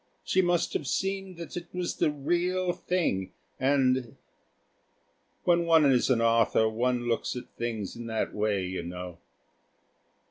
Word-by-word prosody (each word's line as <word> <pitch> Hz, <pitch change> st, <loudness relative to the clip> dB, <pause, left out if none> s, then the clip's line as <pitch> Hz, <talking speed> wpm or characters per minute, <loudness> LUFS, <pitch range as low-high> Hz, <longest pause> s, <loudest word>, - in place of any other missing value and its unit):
She 190 Hz, -, +2 dB
must 175 Hz, -2 st, +1 dB
have 145 Hz, -, -2 dB
seen 195 Hz, +1 st, -2 dB
that 170 Hz, -2 st, -8 dB
it 175 Hz, -1 st, -5 dB
was 180 Hz, -1 st, -2 dB
the -, -, +3 dB
real 175 Hz, +5 st, 0 dB
thing, 95 Hz, -, -1 dB, 0.3 s
and...." 130 Hz, -3 st, +2 dB, 1.3 s
When 170 Hz, -1 st, +3 dB
one 160 Hz, -2 st, +6 dB
is 130 Hz, -2 st, +3 dB
an 120 Hz, -3 st, +3 dB
author 115 Hz, -1 st, +3 dB
one 120 Hz, +2 st, 0 dB
looks 115 Hz, +2 st, -1 dB
at 125 Hz, -, -6 dB
things 115 Hz, -5 st, -4 dB
in 120 Hz, 0 st, -7 dB
that 110 Hz, -1 st, -2 dB
way, 105 Hz, -3 st, 0 dB
you 95 Hz, 0 st, -3 dB
know. 90 Hz, 0 st, -7 dB
130 Hz, 145 wpm, -28 LUFS, 110-170 Hz, 1.3 s, one